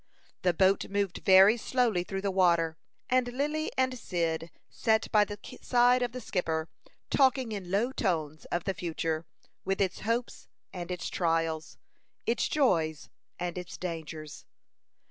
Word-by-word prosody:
The 180 -2 +2
boat 190 +2 +3
moved 200 -2 -1
very 195 +4 +7
slowly 230 -6 +1
through 195 +1 -5
the 200 - 0
water, 170 -4 +3 0.3
and 255 -1 +2
Lily 300 +5 -1
and 260 -1 +1
Cyd 165 -3 -2 0.2
sat 220 0 0
by 210 -1 +6
the 205 0 -7 0.2
side 245 0 +4
of 245 -1 0
the 255 - -6
skipper, 165 -7 -2 0.4
talking 260 -3 +3
in 195 -4 -5
low 210 +7 +1
tones 155 - -2
of 175 0 -2
the 195 - -1
future, 165 -2 -3 0.4
with 195 0 -1
its 190 -2 0
hopes 230 +3 -2 0.3
and 175 -2 -6
its 180 -1 -3
trials, 165 -2 -1 0.5
its 235 - +1
joys 165 - +1 0.3
and 175 0 -3
its 180 - -8
dangers. 160 -3 -6
190 Hz, 145 wpm, -29 LUFS, 165-235 Hz, 0.5 s, very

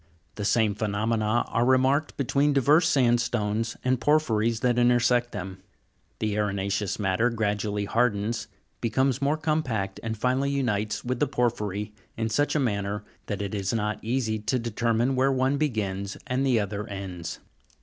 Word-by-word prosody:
The 105 - -4
same 110 -1 +3
phenomena 110 +2 0
are 115 - +1
remarked 130 +4 +2
between 140 +2 +2
diverse 150 +5 +4
sandstones 115 -4 +1
and 130 -1 +1
por 150 +6 +5
phyries 115 -6 0
that 125 -1 +2
intersect 120 0 +3
them. 95 0 -6 0.6
The 105 -1 -1
arena'ceous 100 -1 -1
matter 100 +3 +1
gradually 105 -2 -1
hardens, 115 0 0 0.3
becomes 130 +3 +1
more 145 +3 +2
compact, 130 -11 -1
and 110 -1 -4
finally 130 +4 +1
unites 110 -7 -1
with 125 0 -2
the 150 - +2
porphyry 105 -5 -1 0.2
in 110 0 -1
such 145 +8 +1
a - - +3
manner 105 -4 -1 0.2
that 105 0 -3
it 100 - -4
is 100 -1 -1
not 105 -1 -2
easy 115 -2 -1
to 110 +4 0
determine 115 +2 0
where 135 +1 +3
one 130 +1 +1
begins 100 -9 -2
or 125 0 -1
the 130 -3 +3
other 105 +1 -3
ends. 90 -4 -6
115 Hz, 155 wpm, -26 LUFS, 105-130 Hz, 0.6 s, por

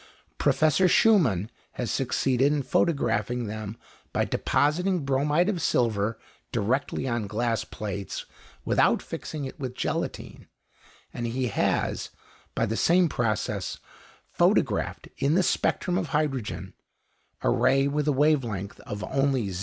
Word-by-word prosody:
Professor 155 +4 +3
Schumann 150 - +4 0.2
has 120 -4 -3
succeeded 135 +1 +1
in 150 -2 0
photographing 120 - +1
them 110 0 -6 0.3
by - - +1
depositing 175 +2 +1
bromide 145 +6 +2
of 195 -5 -1
silver 110 -4 +1 0.3
directly 130 +4 -1
on 120 -4 -1
glass 115 +1 -1
plates 100 -3 -5 0.4
without - - +3
fixing 150 -3 -6
it 130 - -8
with 130 -2 -4
gelatine; - - -4 0.7
and 120 -1 -3
he 125 +1 -1
has, - - 0 0.5
by 115 - +2
the 110 0 -2
same 175 +6 +4
process, 115 -6 -1 0.6
photographed - - +1
in 140 +3 +2
the 185 - +4
spectrum 180 0 +1
of - - -3
hydrogen 125 - -2 0.7
a - - +3
ray 135 - +3
with 150 +1 -1
a - - +4
wave 145 0 +3
length 100 -3 -5
of 105 0 -5
only 135 -4 0
0. 90 - -4
130 Hz, 130 wpm, -26 LUFS, 110-150 Hz, 0.7 s, Schumann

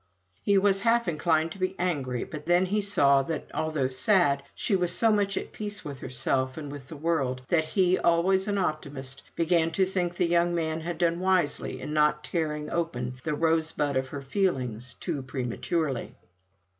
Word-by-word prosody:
He 200 -1 +3
was 195 0 +3
half 235 -1 +3
inclined 160 0 +1
to 195 - -9
be 185 +1 -1
angry; 140 -9 -1
but 150 0 -8
then 175 +2 +4
he 205 +3 0
saw 145 -9 +4
that, 160 +4 -5
although 155 -4 0
sad, 140 +1 +3
she 205 - +1
was 180 -2 +1
so 225 -1 +4
much 200 -2 +1
at - - -4
peace 210 0 -6
with 140 -3 -6
herself 130 0 -1
and 145 -3 -6
with 140 -2 -9
the 160 - -9
world, 140 -5 -1
that 160 -2 +3
he, 185 +2 +2
always 190 +3 +2
an 205 -1 0
optimist, 140 -6 -3
began 165 -1 +2
to 190 +3 +3
think 180 -2 -1
the 175 - +2
young 170 0 +2
man 160 -1 -1
had 170 0 -4
done 170 0 +1
wisely 185 -5 0
in 150 - -5
not 150 0 +2
tearing 150 -2 -2
open 125 -7 -2
the 155 -2 -1
rosebud 160 -2 +1
of 130 0 0
her 140 +1 -7
feelings 130 - -1
too 160 -6 -3
prematurely. 130 +3 -2
160 Hz, 180 wpm, -27 LUFS, 140-185 Hz, -, then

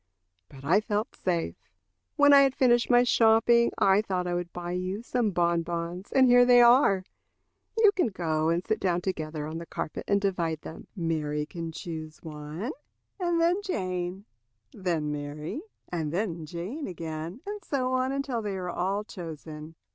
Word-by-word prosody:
But 135 0 -13
I 185 +8 +4
felt 215 +3 -2
safe. 170 -3 -3 0.5
When 285 -1 +6
I 280 - +9
had 270 -1 +3
finished 240 -2 +3
my 245 -1 +6
shopping, 235 0 +4
I 195 +1 +4
thought 185 -4 -2
I 175 - -2
would 175 0 -3
buy 175 0 -5
you 185 +4 -3
some 240 -2 0
bonbons, 170 0 -1
and 265 -1 +5
here 245 0 +7
they 245 0 +6
are. 240 -6 +6 0.7
You 435 -2 +6
can 365 -9 +1
go 160 -6 -1
and 170 +2 0
sit 220 - 0
down 180 -2 0
together 155 -5 -3
on 160 +2 -5
the 170 - -9
carpet - - -5
and 200 - +3
divide 170 -6 -1
them. 160 - -10
Mary 155 -4 -1
can 165 +1 -6
choose 160 -1 -7
one, 155 - -6 0.5
and 345 -2 +1
then 345 +4 +2
Jane; 185 - -3 0.5
then 165 -6 -1
Mary, 150 - -5 0.3
and 160 -4 -2
then 170 -3 -2
Jane 185 - -5
again; 165 +3 -6
and 410 0 -6
so 260 -2 -1
on 255 +1 +1
until 275 -4 -2
they 205 -3 -3
are 180 -1 -4
all 195 +4 -1
chosen." 160 -4 -9
180 Hz, 170 wpm, -28 LUFS, 165-240 Hz, 0.7 s, I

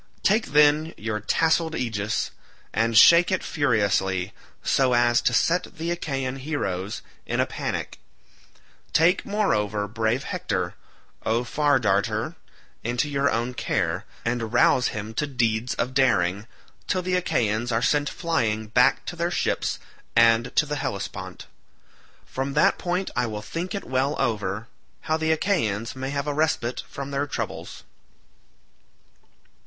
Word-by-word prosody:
Take, 215 +3 +3
then, 150 +2 +4
your 110 -1 -3
tasselled 160 - +1
aegis, 110 -3 -2 0.4
and 115 0 +2
shake 170 +9 +8
it 185 - 0
furiously, 100 - 0 0.3
so 130 -2 +2
as 120 0 +4
to - - +2
set 180 +2 +1
the 165 +2 -2
Achaean 135 -6 -3
heroes 105 - -3 0.2
in - - -1
a - - +4
panic; - - -4 0.9
take, 175 +4 +3
moreover, 105 - 0
brave 110 +4 -1
Hector, - - -2 0.5
O 115 +2 +1
Far 145 +2 +2
Darter, 100 -4 0 0.5
into 120 +5 0
your 140 -1 +1
own 120 +3 -1
care, - - -1 0.2
and 115 -1 -1
rouse 125 +1 +4
him 110 +1 -5
to 150 +6 -1
deeds 120 -3 0
of 125 - -2
daring, 100 -6 +2 0.4
till 185 -2 0
the 185 +1 -2
Achaeans 120 - 0
are 115 +1 +1
sent 145 -1 +2
flying 115 -11 -1
back 125 +4 +3
to - - -5
their 170 0 -1
ships 175 - -1 0.4
and 115 +1 +4
to 150 - +4
the 150 0 -3
Hellespont. 100 -7 -5 0.8
From 135 +1 -4
that 150 - +3
point 180 +2 -2
I 125 0 +1
will 105 -1 -5
think 170 - -4
it 200 - -4
well 135 +3 -1
over, 110 -3 -1 0.3
how 155 - 0
the 160 0 0
Achaeans 125 - 0
may 130 +1 -4
have 140 0 -2
a 145 - -1
respite 145 -5 0
from 140 0 -6
their 140 +1 -1
troubles." - - -5
125 Hz, 140 wpm, -25 LUFS, 110-150 Hz, 0.9 s, shake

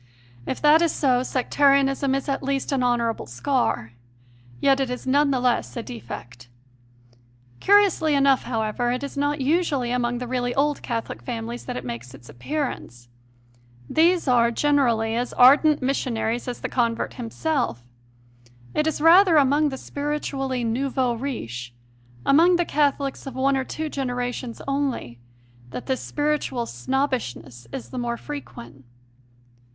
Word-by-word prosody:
If - - -3
that 300 +2 +6
is 335 -2 +3
so, 255 -4 +2
Sectari 275 +2 +3
anism 270 0 0
is 275 - -3
at 275 -1 -1
least 275 0 -2
an 270 -2 +1
honourable 235 - 0
scar; 120 - -1 0.7
yet 270 - +3
it 265 -2 0
is 250 +1 -5
none 285 +2 +3
the 265 -2 +1
less 245 0 0
a 235 - -3
defect. 125 - -9 1.1
Curiously 390 -7 +4
enough, 275 -1 +3
however, 225 0 -1
it 250 +3 -2
is 280 - -6
not 290 +1 0
usually 280 -4 +1
among 245 -1 0
the 250 - -4
really 245 0 -2
old 290 +1 +1
Catholic 230 - -4
families 115 0 -5
that - - -4
it 125 - -6
makes 120 +2 -7
its 120 -2 -16
appearance; 120 - -5 0.8
these 340 +1 +3
are, 240 -2 +4
generally, 235 -4 +1
as 245 +1 -2
ardent 285 +3 +5
missionaries 245 -3 -1
as 245 - -5
the - - -2
convert 235 -2 -1
himself: 245 - -2 0.9
it 305 - +1
is 315 - -1
rather 340 +1 +7
among 290 +2 +3
the 265 - -6
spiritually 275 -3 -3
nouveaux 255 +1 0
riches 125 - -5 0.5
among 335 +6 +5
the 350 0 +1
Catholics 285 -2 0
of 265 - -7
one 270 +1 +2
or 265 - 0
two 315 +4 -4
genera 250 -4 -2
tions 245 -2 -7
only 275 - -2 0.5
that 245 - -7
this 260 -1 -1
spiritual 295 -5 -1
snobbishness 130 - -3
is 120 - -7
the - - -4
more 235 -1 -2
frequent. 135 - -9
260 Hz, 150 wpm, -24 LUFS, 235-285 Hz, 1.1 s, rather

